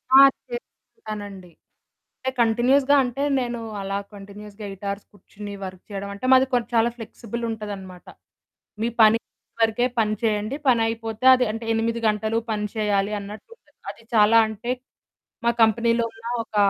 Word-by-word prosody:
ఆ! - - +11 0.3
చేస్తుంటానండి. 205 -5 -9 0.7
అంటే 260 - -2
కంటిన్యూయస్‌గా 255 +5 +3
అంటే 255 +3 -3 0.2
నేను 240 -1 -3 0.2
అలా 195 0 -2 0.2
కంటిన్యూయస్‌గా 205 +1 -10
8 195 +1 -9
ఆర్స్ 200 +1 -7
కూర్చొని 205 +1 -10
వర్క్ 185 -1 -9
చేయడం 200 -1 -5
అంటే 200 +5 -7
మాది 260 +1 +5
కొం 245 -1 +3
చాలా 230 +1 +4
ఫ్లెక్సిబుల్ 235 +1 -7
ఉంటదనమాట. 200 -5 -7 0.8
మీ 230 - +1
పని 220 +1 +6 0.4
వరకే 225 +2 +2
పని 215 -1 +2
చేయండి. 215 +2 0
పని 240 -3 +4
అయిపోతే 225 +1 -4
అది 250 0 +1
అంటే 225 +1 -6
8 230 +1 0
గంటలు 215 +1 0
పని 210 -1 -1
చేయాలి 205 -1 0
అన్నట్టు 205 +2 -10
ఉండదు. - - -34
అది - - -19
చాలా 215 +2 +6
అంటే 220 +3 -4 0.7
మా 235 - +5
కంపెనీలో 230 +1 +2
ఉన్న 225 +1 -16 0.2
ఒక 220 - -15
220 Hz, 145 wpm, -23 LUFS, 205-235 Hz, 0.8 s, ఆ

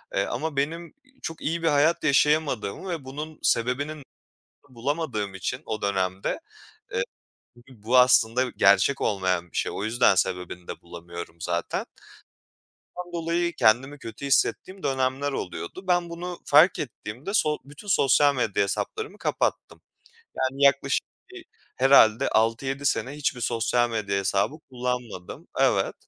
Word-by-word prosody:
ııı, 100 - 0
ama 160 -2 -3
benim, 165 +5 -2
iii, 265 0 -29
çok 165 - -6
iyi 165 +2 -2
bir - - +2
hayat 155 +3 +3
yaşayamadığımı 150 - +1
ve 160 -6 -4
bunun 150 +4 -7
sebebinin 140 +5 0 0.7
bu 130 - -20
bulamadığım 115 -6 -2
için 95 - -4
o 110 -2 -4
dönemde, 95 -1 -1 0.5
ııı, 95 - +1 0.5
b 120 -3 -19
bu 125 +3 +3
aslında 125 -1 +5
gerçek 100 +7 +3
olmayan 95 -4 0
bir - - -6
şey. - - 0
O 100 - -3
yüzden 110 -2 +3
sebebini 90 -1 -2
de - - -7
bulamıyorum 85 -1 -9
zaten. 85 0 -2 1.1
Bundan 175 -1 -7
dolayı 170 +1 -1
kendimi 135 +6 +3
kötü 115 +3 -8
hissettiğim 185 +7 +1
dönemler 135 +1 0
oluyordu. 90 - -6
Ben 175 -1 +2
bunu 175 +1 -6
fark 155 +5 +6
ettiğimde 120 - -6
so 150 -6 +2
bütün 145 +8 -13
sosyal 145 -3 +4
medya 110 -6 +1
hesaplarımı 425 - -3
kapattım. - - -2 0.6
Yani 135 +2 0
yaklaşık 140 0 +3 0.3
bir - - -11 0.3
herhâlde 130 -2 +5
6-7 135 +5 0
sene 130 - 0
hiçbir 140 -4 -2
sosyal 120 +1 +1
medya 100 -3 -1
hesabı 100 +7 0 0.2
kullanmadım. 125 -7 -5
Evet. - - +2
130 Hz, 140 wpm, -25 LUFS, 105-150 Hz, 1.1 s, fark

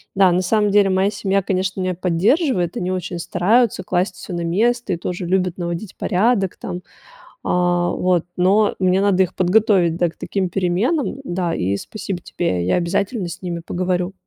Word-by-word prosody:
Да, 190 -2 +5
на 180 +1 +2
самом 210 +2 +1
деле 200 -1 +4
моя 190 +2 +2
семья, 195 -1 0
конечно, 190 0 -1
меня 185 0 -1
поддерживает, 180 - +1
они 180 - -2
очень 180 -1 -3
стараются 210 +4 +2
класть 180 +1 -1
всё 185 - -8
на 170 - -2
место 220 +5 +1
и - - -2
тоже 180 +1 -4
любят 185 -1 0
наводить 175 +3 -4
порядок 195 0 +1
там, 175 - -6 0.6
а, 175 0 +1
вот. 180 -2 +1
Но 200 +4 +3
мне 185 0 +2
надо 195 -2 +3
их 185 - -4
подготовить, 185 -2 +3
да, 175 -1 +2
к 160 - -17
таким 190 -2 -2
переменам, 200 - 0
да. 175 -6 -2
И 95 +2 0
спасибо 190 - -5
тебе. 90 - -2
Я - - +3
обязательно 190 +3 -1
с 170 - -8
ними 175 -2 -4
поговорю. 180 +1 -1
185 Hz, 175 wpm, -20 LUFS, 175-200 Hz, 0.6 s, Да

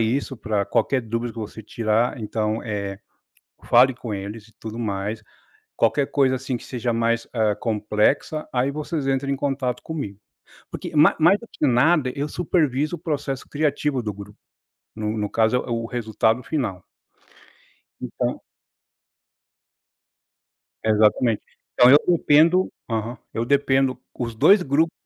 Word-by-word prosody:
isso, 130 +4 -1
para 105 -3 -1
qualquer 130 +6 +1
dúvida 115 0 -3
que - - -10
você 110 0 -7
tirar. 115 +3 0
Então, 110 0 -2
eh, 100 -3 -4 0.7
fale 125 +2 +5
com 120 -3 -7
eles, 105 +2 -6
e - - -23
tudo 110 0 -7
mais. 105 0 -3 0.5
Qualquer 135 +5 +2
coisa, 135 -2 +3
assim, 130 0 -3
que - - -14
seja 120 -2 -3
mais, 115 0 0
eh, 110 -3 +1
complexa, 110 +8 0
aí 130 +2 +1
vocês 150 0 -3
entram 135 +1 0
em - - +1
contato 130 -3 -2
comigo". 120 -12 -6 0.5
Porque - - -6
ma 150 - +6
mais 175 +6 +5
do 235 - -12
que 150 - 0
nada, 130 +2 +3
eu 145 +2 -2
supervisiono 155 -2 0
o - - -13
processo 140 -4 -3
criativo 145 -3 0
do 105 -2 -3
grupo. 100 +1 -11 0.6
No 110 0 -3
no 105 -1 -2
caso 110 +3 +2
é 125 - +3
o - - -4
é - - -9
o 115 0 -1
resultado 115 0 0
final. 105 - -3 1.2
Então - - -3 2.4
Exatamente. 110 +1 +3 0.3
Então 125 - +6
eu 145 - +10 0.2
dependo 165 +6 +4 0.2
aham, 115 +2 -3 0.2
eu 115 +1 -1
dependo, 135 -1 +2 0.2
os 115 -2 -4
2 200 - +6
grupo 160 +2 +1
120 Hz, 150 wpm, -23 LUFS, 110-140 Hz, 2.4 s, eu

